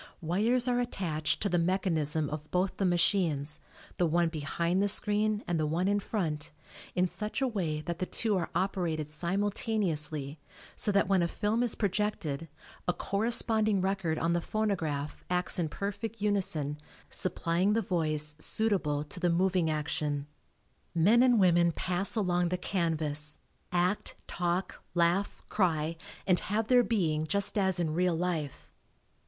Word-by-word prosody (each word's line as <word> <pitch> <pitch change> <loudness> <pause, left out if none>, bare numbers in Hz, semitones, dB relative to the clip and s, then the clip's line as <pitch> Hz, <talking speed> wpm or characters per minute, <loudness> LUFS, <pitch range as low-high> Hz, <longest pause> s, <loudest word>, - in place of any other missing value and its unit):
Wires 220 +10 +2
are 245 -1 +2
attached 170 -11 -2
to - - +1
the 175 - +2
mechanism 165 -4 0
of 150 0 -6
both 185 +1 0
the 195 - +1
machines, 165 -4 +1 0.4
the 175 - +2
one 170 +1 +2
behind 170 +4 -1
the 205 - +2
screen 210 +1 +3
and 170 -2 0
the 155 - +1
one 170 +5 0
in 205 +1 +2
front, 160 -8 -3 0.4
in 180 0 +3
such 210 +4 -3
a 270 - +1
way 170 -10 -2
that 170 +2 -5
the 185 - -2
two 220 -3 0
are 175 -3 -1
operated 170 -5 -1
simultaneously 170 -5 -1 0.4
so 215 - +1
that 200 -2 +2
when 190 -2 +3
a 170 - +2
film 210 +6 -1
is 245 -3 0
projected 185 -7 -2 0.4
a 180 - +2
corresponding 220 +1 +2
record 190 -4 -1
on 165 +1 +1
the 175 - +1
phonograph 165 -9 -2
acts 180 0 0
in 165 -3 0
perfect 205 +5 -5
unison 175 -8 0 0.3
supplying 180 +2 +1
the 225 - +2
voice 155 -4 +1
suitable 180 -10 +2
to 150 +4 -8
the 175 - +1
moving 180 -1 +2
action. 150 -2 -2 0.7
Men 205 +9 +5
and 245 -3 +5
women 175 -2 +4
pass 185 +6 +2
along 180 -4 +1
the 180 - -1
canvas, 155 -5 -1 0.3
act, 180 +3 0
talk, 175 +2 -2
laugh, 175 +4 +1
cry 165 -5 0 0.3
and 180 -3 +3
"have 215 +3 -2
their 250 -1 +6
being" 160 -9 0
just 200 +3 +1
as 190 -3 +2
in 160 -3 0
real 180 +1 +1
life. 160 -5 -3
180 Hz, 155 wpm, -30 LUFS, 160-200 Hz, 0.7 s, their